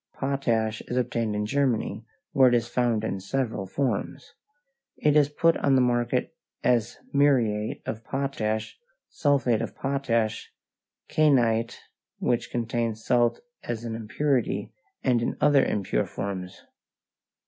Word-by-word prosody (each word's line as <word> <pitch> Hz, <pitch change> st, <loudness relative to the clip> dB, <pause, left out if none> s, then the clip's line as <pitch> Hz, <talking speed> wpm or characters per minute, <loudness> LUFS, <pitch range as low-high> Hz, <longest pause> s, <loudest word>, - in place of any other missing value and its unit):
Potash 115 Hz, -5 st, 0 dB
is 125 Hz, -, -2 dB
obtained 115 Hz, -3 st, 0 dB
in 105 Hz, 0 st, -1 dB
Germany, 125 Hz, -2 st, 0 dB, 0.3 s
where 135 Hz, -4 st, +6 dB
it 120 Hz, -, +3 dB
is 115 Hz, -1 st, +1 dB
found 120 Hz, -3 st, 0 dB
in 100 Hz, -3 st, -2 dB
several 110 Hz, -1 st, -2 dB
forms. 120 Hz, 0 st, -3 dB, 0.6 s
It 150 Hz, -1 st, +2 dB
is 145 Hz, -2 st, +5 dB
put 165 Hz, +3 st, +3 dB
on 140 Hz, -1 st, +2 dB
the 130 Hz, -, +5 dB
market 120 Hz, -1 st, 0 dB, 0.3 s
as 120 Hz, -3 st, +1 dB, 0.2 s
muriate 120 Hz, -7 st, +2 dB
of 110 Hz, +1 st, -5 dB
potash, 115 Hz, -, -2 dB, 0.3 s
sulphate 130 Hz, -6 st, +1 dB
of 115 Hz, -, -5 dB
potash, 115 Hz, -5 st, -1 dB, 0.6 s
kainite, 120 Hz, -6 st, +2 dB, 0.4 s
which 120 Hz, -, 0 dB
contains 115 Hz, -2 st, -2 dB
salt 120 Hz, -1 st, +2 dB, 0.2 s
as 115 Hz, -1 st, -4 dB
an 115 Hz, -, -4 dB
impurity, 125 Hz, +4 st, -1 dB, 0.3 s
and 125 Hz, -3 st, +2 dB
in 115 Hz, -, -2 dB
other 145 Hz, -2 st, +5 dB
impure 100 Hz, -3 st, 0 dB
forms. 95 Hz, -2 st, -5 dB
120 Hz, 125 wpm, -26 LUFS, 110-135 Hz, 0.6 s, where